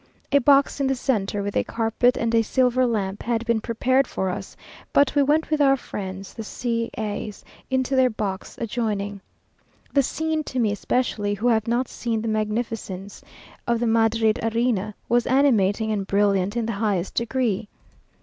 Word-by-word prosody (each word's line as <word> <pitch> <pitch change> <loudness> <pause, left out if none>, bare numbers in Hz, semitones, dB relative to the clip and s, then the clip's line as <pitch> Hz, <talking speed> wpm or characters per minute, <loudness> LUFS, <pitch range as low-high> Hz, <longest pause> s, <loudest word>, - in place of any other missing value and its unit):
A 285 - +6
box 280 +1 +4
in 275 - +1
the 270 - +1
centre, 205 -6 -1
with 205 0 -4
a - - +2
carpet 230 +2 +1
and 230 0 -1
a 230 - +5
silver 255 +2 +2
lamp, 205 -4 -2
had 235 -1 -1
been 230 -1 +1
prepared 255 +4 +1
for 190 - -2
us; - - -7 0.4
but 285 -1 +4
we 290 - +3
went 300 +3 +2
with 305 -1 +2
our 275 -1 +5
friends, 190 -4 -7
the 225 - -6
C 230 +1 -2
as, 210 -1 -4 0.2
into 260 0 0
their 260 -1 +4
box 205 -4 -4
adjoining. 205 -3 -2 0.7
The 280 - +5
scene, 315 +3 -1
to 260 - -5
me 225 -4 +2
especially, 205 -1 -1
who 230 +5 +1
have 220 -2 +2
not 240 +2 +1
seen 230 -2 -2
the - - -2
magnificence 215 -3 -3 0.5
of 235 -1 +1
the 240 - 0
Madrid 225 -1 +2
arena, 225 -3 0
was 240 0 +2
animating 220 -6 +3
and 200 -2 -2
brilliant 200 +1 +1
in 235 - 0
the 230 - -2
highest 200 -4 0
degree. 235 -3 -1
230 Hz, 175 wpm, -24 LUFS, 205-255 Hz, 0.7 s, A